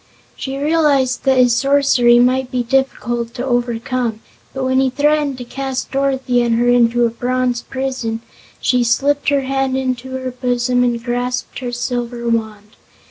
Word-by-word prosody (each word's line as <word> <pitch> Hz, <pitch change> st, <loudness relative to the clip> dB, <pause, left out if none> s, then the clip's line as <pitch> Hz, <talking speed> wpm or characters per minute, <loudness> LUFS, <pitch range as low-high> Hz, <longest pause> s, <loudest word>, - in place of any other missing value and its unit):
She 270 Hz, 0 st, -5 dB
realized 285 Hz, -4 st, +1 dB
that 265 Hz, -1 st, +3 dB
his 250 Hz, -2 st, +4 dB
sorcery 270 Hz, -3 st, +4 dB
might 255 Hz, +1 st, +2 dB
be 250 Hz, -1 st, -1 dB
difficult 240 Hz, -2 st, -1 dB
to 250 Hz, 0 st, -3 dB
overcome, 240 Hz, -2 st, -1 dB, 0.3 s
and 265 Hz, -1 st, -2 dB
when 260 Hz, 0 st, +2 dB
he 265 Hz, 0 st, +2 dB
threatened 290 Hz, 0 st, +1 dB
to 250 Hz, -, -6 dB
cast 265 Hz, +1 st, -4 dB
Dorothy 265 Hz, -2 st, +1 dB
and 235 Hz, -1 st, +1 dB
her 240 Hz, +1 st, +1 dB
into 240 Hz, 0 st, +3 dB
a 230 Hz, -, 0 dB
bronze 250 Hz, 0 st, -1 dB
prison 260 Hz, -4 st, -4 dB, 0.4 s
she 250 Hz, -1 st, +2 dB
slipped 280 Hz, +5 st, +1 dB
her 285 Hz, -1 st, +2 dB
hand 270 Hz, 0 st, -1 dB
into 260 Hz, 0 st, -3 dB
her 260 Hz, -1 st, -4 dB
bosom 245 Hz, 0 st, 0 dB
and 240 Hz, -1 st, -1 dB
grasped 245 Hz, +1 st, -3 dB
her 250 Hz, -1 st, -4 dB
silver 240 Hz, -1 st, -3 dB
wand. 220 Hz, -2 st, -3 dB
250 Hz, 160 wpm, -18 LUFS, 240-265 Hz, 0.4 s, his